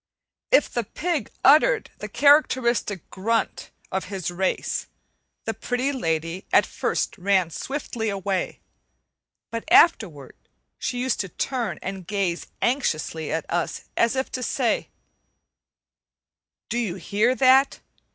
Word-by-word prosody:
If -, -, +5 dB
the 240 Hz, -, -2 dB
pig 305 Hz, -, -2 dB
uttered 310 Hz, -, +5 dB
the -, -, -5 dB
characteristic 255 Hz, -, +3 dB
grunt 225 Hz, +4 st, -1 dB, 0.2 s
of 190 Hz, -, -2 dB
his 185 Hz, -3 st, -4 dB
race, 185 Hz, +2 st, -1 dB, 0.6 s
the -, -, -1 dB
Pretty 255 Hz, +3 st, -1 dB
Lady 165 Hz, -, -2 dB
at -, -, +5 dB
first -, -, -2 dB
ran 185 Hz, -2 st, +2 dB
swiftly 245 Hz, -, -3 dB
away; 195 Hz, -2 st, -2 dB, 0.9 s
but 230 Hz, 0 st, -3 dB
afterward 215 Hz, -, +4 dB, 0.4 s
she 245 Hz, -, -2 dB
used 255 Hz, -1 st, 0 dB
to 195 Hz, -, -2 dB
turn 235 Hz, -, -2 dB
and 190 Hz, -2 st, -6 dB
gaze 195 Hz, -4 st, -1 dB, 0.2 s
anxiously 160 Hz, -, -1 dB
at 160 Hz, 0 st, -2 dB
us, 175 Hz, -1 st, -2 dB
as 230 Hz, +2 st, +2 dB
if 265 Hz, 0 st, -2 dB
to 255 Hz, -, -4 dB
say: 245 Hz, -1 st, 0 dB, 1.8 s
"Do 240 Hz, -, -1 dB
you 205 Hz, -7 st, -2 dB
hear 210 Hz, +6 st, +1 dB
that? 265 Hz, +1 st, +4 dB
220 Hz, 120 wpm, -24 LUFS, 185-260 Hz, 1.8 s, If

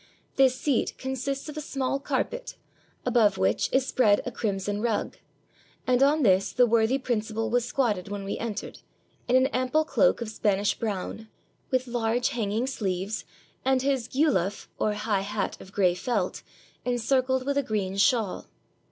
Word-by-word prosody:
This 265 Hz, -1 st, +4 dB
seat 270 Hz, -1 st, 0 dB
consists 265 Hz, +2 st, -3 dB
of 300 Hz, -, -7 dB
a -, -, -2 dB
small 275 Hz, -2 st, -2 dB
car 275 Hz, -, 0 dB
pet, -, -, -8 dB, 0.5 s
above 215 Hz, -4 st, +3 dB
which 95 Hz, +3 st, +1 dB
is 265 Hz, -1 st, +2 dB
spread 210 Hz, -6 st, +3 dB
a 250 Hz, -, -3 dB
crimson 205 Hz, -2 st, -2 dB
rug; 230 Hz, -2 st, -1 dB, 0.7 s
and 250 Hz, 0 st, +2 dB
on 290 Hz, +2 st, +4 dB
this 190 Hz, -3 st, +3 dB
the 250 Hz, -, +4 dB
worthy 230 Hz, +2 st, +3 dB
principal 225 Hz, -3 st, -2 dB
was 245 Hz, -1 st, +2 dB
squatted 230 Hz, -8 st, 0 dB
when 205 Hz, -1 st, -4 dB
we 195 Hz, -, -4 dB
entered, 220 Hz, -2 st, -5 dB, 0.5 s
in 250 Hz, -, +3 dB
an 260 Hz, 0 st, +5 dB
ample 255 Hz, +5 st, +1 dB
cloak -, -, +3 dB
of 235 Hz, -2 st, -4 dB
Spanish 205 Hz, -2 st, +1 dB
brown, 220 Hz, 0 st, -4 dB, 0.4 s
with 255 Hz, -1 st, +1 dB
large 240 Hz, 0 st, 0 dB
hanging 220 Hz, 0 st, -1 dB
sleeves, 195 Hz, -5 st, -3 dB, 0.4 s
and 265 Hz, 0 st, +2 dB
his 270 Hz, -4 st, 0 dB
geulaf, 255 Hz, -, +1 dB
or 215 Hz, -, +1 dB
high 210 Hz, -1 st, 0 dB
hat 205 Hz, 0 st, -3 dB
of 190 Hz, -, -12 dB
gray 185 Hz, -3 st, +3 dB
felt, 195 Hz, -1 st, -2 dB, 0.4 s
encircled 255 Hz, +2 st, +1 dB
with 280 Hz, 0 st, 0 dB
a -, -, +2 dB
green 205 Hz, -6 st, -2 dB
shawl. 210 Hz, 0 st, +1 dB
235 Hz, 160 wpm, -27 LUFS, 205-260 Hz, 0.7 s, an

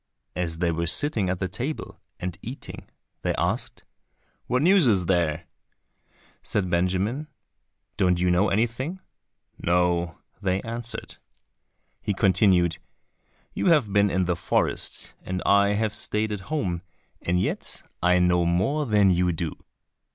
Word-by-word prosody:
And 90 Hz, -, 0 dB
as 80 Hz, -1 st, -3 dB
they 85 Hz, 0 st, +1 dB
were 85 Hz, +1 st, -2 dB
sitting 110 Hz, -, +2 dB
at 90 Hz, 0 st, -2 dB
table, 130 Hz, +9 st, -5 dB, 0.2 s
and 90 Hz, -1 st, -4 dB
eating, 125 Hz, +5 st, -8 dB, 0.3 s
they -, -, 0 dB
asked, -, -, -2 dB, 0.6 s
"What 125 Hz, +3 st, +1 dB
news 185 Hz, -3 st, +5 dB
is 95 Hz, -6 st, +3 dB
there?" 85 Hz, -2 st, +1 dB, 1.0 s
Said 95 Hz, -3 st, 0 dB
Benjamin, 95 Hz, -, 0 dB, 0.7 s
"Don't 90 Hz, -3 st, +2 dB
you 90 Hz, 0 st, +2 dB
know 95 Hz, +4 st, +3 dB
anything?" 120 Hz, -, -1 dB, 0.6 s
"No," 85 Hz, -1 st, +1 dB, 0.2 s
they 95 Hz, -1 st, +1 dB
answered. 115 Hz, +1 st, -4 dB, 0.8 s
He 100 Hz, -1 st, -1 dB
continued, 90 Hz, -4 st, +3 dB, 0.7 s
"You -, -, -1 dB
have 145 Hz, -, +3 dB
been 100 Hz, 0 st, +4 dB
in 95 Hz, 0 st, +1 dB
the 90 Hz, 0 st, 0 dB
forest 85 Hz, -, -1 dB
and 90 Hz, 0 st, -3 dB
I 100 Hz, 0 st, +4 dB
have 110 Hz, 0 st, 0 dB
stayed 105 Hz, 0 st, -1 dB
at 105 Hz, -, -3 dB
home, 95 Hz, -, -1 dB, 0.4 s
and 90 Hz, +1 st, +1 dB
yet 95 Hz, -, -2 dB, 0.2 s
I 90 Hz, +1 st, +4 dB
know 90 Hz, -1 st, +3 dB
more 95 Hz, -, +1 dB
than 105 Hz, -3 st, +4 dB
you 90 Hz, 0 st, +2 dB
do." 80 Hz, -1 st, -3 dB
95 Hz, 135 wpm, -25 LUFS, 90-110 Hz, 1.0 s, news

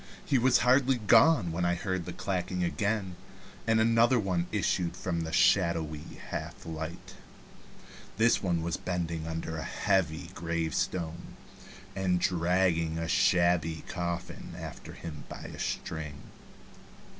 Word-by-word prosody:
He 135 Hz, -3 st, +3 dB
was 125 Hz, +1 st, +5 dB
hardly 130 Hz, +1 st, +4 dB
gone 110 Hz, -, +5 dB
when 85 Hz, +2 st, -2 dB
I 85 Hz, 0 st, +2 dB
heard 95 Hz, -1 st, -2 dB
the 90 Hz, -, -5 dB
clacking 90 Hz, -1 st, -2 dB
again, 100 Hz, 0 st, -1 dB, 0.5 s
and 110 Hz, 0 st, +4 dB
another 115 Hz, +2 st, +4 dB
one 90 Hz, -4 st, 0 dB
issued 95 Hz, -4 st, 0 dB
from 85 Hz, -3 st, -2 dB
the 80 Hz, 0 st, -4 dB
shadowy 80 Hz, -5 st, +1 dB
half -, -, -5 dB
light. 80 Hz, +1 st, -6 dB, 1.0 s
This 115 Hz, +2 st, +4 dB
one 85 Hz, -3 st, 0 dB
was 85 Hz, 0 st, -1 dB
bending 85 Hz, -3 st, -3 dB
under 80 Hz, 0 st, -4 dB
a 80 Hz, -, -4 dB
heavy 90 Hz, -5 st, 0 dB
gravestone, 85 Hz, +1 st, -2 dB, 0.6 s
and 95 Hz, -2 st, +1 dB
dragging 85 Hz, -2 st, +1 dB
a 80 Hz, 0 st, -2 dB
shabby 85 Hz, -2 st, +2 dB
coffin 85 Hz, 0 st, -4 dB
after -, -, -8 dB
him 75 Hz, -4 st, -8 dB
by -, -, -8 dB
a -, -, -8 dB
string. 75 Hz, -2 st, -4 dB
90 Hz, 130 wpm, -30 LUFS, 80-95 Hz, 1.0 s, was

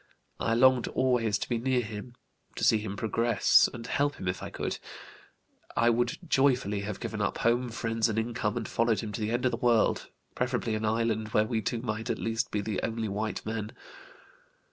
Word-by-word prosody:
I 115 Hz, -, +1 dB
longed 130 Hz, 0 st, +5 dB
always 120 Hz, -5 st, +1 dB
to -, -, -4 dB
be 120 Hz, -2 st, -1 dB
near 125 Hz, +1 st, +1 dB
him, 110 Hz, +2 st, -8 dB, 0.4 s
to -, -, -4 dB
see 110 Hz, -, +5 dB
him 100 Hz, -1 st, -5 dB
progress 115 Hz, +1 st, +4 dB
and 115 Hz, -1 st, -8 dB
help 145 Hz, +3 st, 0 dB
him 95 Hz, -, -6 dB
if 90 Hz, 0 st, -2 dB
I -, -, -5 dB
could. -, -, -4 dB, 1.0 s
I 120 Hz, 0 st, +5 dB
would 120 Hz, +1 st, 0 dB
joyfully 125 Hz, -8 st, +2 dB
have 100 Hz, 0 st, -5 dB
given -, -, -4 dB
up -, -, 0 dB
home, 120 Hz, +2 st, +1 dB
friends, 115 Hz, -1 st, 0 dB
and 110 Hz, -, -2 dB
income, 110 Hz, -2 st, -1 dB
and -, -, -3 dB
followed 115 Hz, -3 st, +1 dB
him 110 Hz, -, -5 dB
to 110 Hz, -, -5 dB
the 105 Hz, -, 0 dB
end 120 Hz, +2 st, 0 dB
of 125 Hz, -, +3 dB
the -, -, -2 dB
world, 120 Hz, -3 st, +2 dB, 0.2 s
preferably 120 Hz, -2 st, -1 dB
an 110 Hz, 0 st, -1 dB
island 110 Hz, 0 st, 0 dB
where 105 Hz, -, +4 dB
we 110 Hz, 0 st, -1 dB
two 115 Hz, +2 st, -2 dB
might 110 Hz, -1 st, -3 dB
at -, -, 0 dB
least 115 Hz, +1 st, -1 dB
be 105 Hz, -, -1 dB
the 105 Hz, -1 st, -2 dB
only 115 Hz, -1 st, -2 dB
white 105 Hz, +2 st, -3 dB
men. 110 Hz, -1 st, -4 dB
115 Hz, 205 wpm, -29 LUFS, 110-120 Hz, 1.0 s, longed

